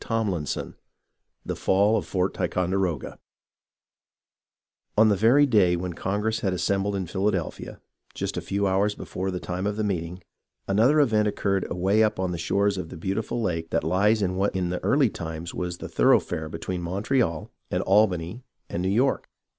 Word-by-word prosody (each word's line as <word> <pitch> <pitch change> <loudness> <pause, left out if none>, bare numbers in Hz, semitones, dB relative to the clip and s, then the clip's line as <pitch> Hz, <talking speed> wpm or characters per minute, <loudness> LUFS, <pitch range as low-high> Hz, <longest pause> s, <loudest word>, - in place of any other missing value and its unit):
CHAPTER 110 -6 -1
VI 75 - -4 0.7
THE - - -3
FALL 100 +3 +3
OF - - -2
FORT 95 0 0
TICONDEROGA 90 -2 -1 1.8
On 110 +1 +6
the 105 - +3
very 120 +9 +5
day 100 -9 +3
wheji 90 -1 -4
Congress 105 +3 -1
had 95 -4 -1
assembled 95 +3 0
in 95 -2 -2
Phil 95 +3 -3
adelphia, 95 -6 -3 0.4
just - - -3
a - - -2
few 100 +1 -1
hours 100 +2 +1
before 95 +1 -4
the 90 -1 -3
time 90 +3 -3
of 105 0 -2
meeting, 90 -4 -3 0.4
another 115 +10 +4
event 110 -7 +3
occurred 100 -2 0
away 95 +4 +2
up 110 -2 +2
on 95 -1 -1
the 85 - -4
shores 100 +3 +1
of 85 - -5
the - - -9
beautiful 105 +7 -2
lake 80 -4 -2
that - - 0
lies 105 +3 +2
in 95 -1 -1
what 100 0 0
in 90 -2 0
the 90 - -4
early 140 -5 +3
times 80 0 -6
was 90 -1 -4
the - - -7
thoroughfare 80 0 +2
between 90 +2 -4
Montreal 95 - -1 0.2
and - - -1
Albany 95 +1 +2 0.3
and 85 - -3
New 95 - 0
York. 125 +7 +1
95 Hz, 175 wpm, -25 LUFS, 90-105 Hz, 1.8 s, On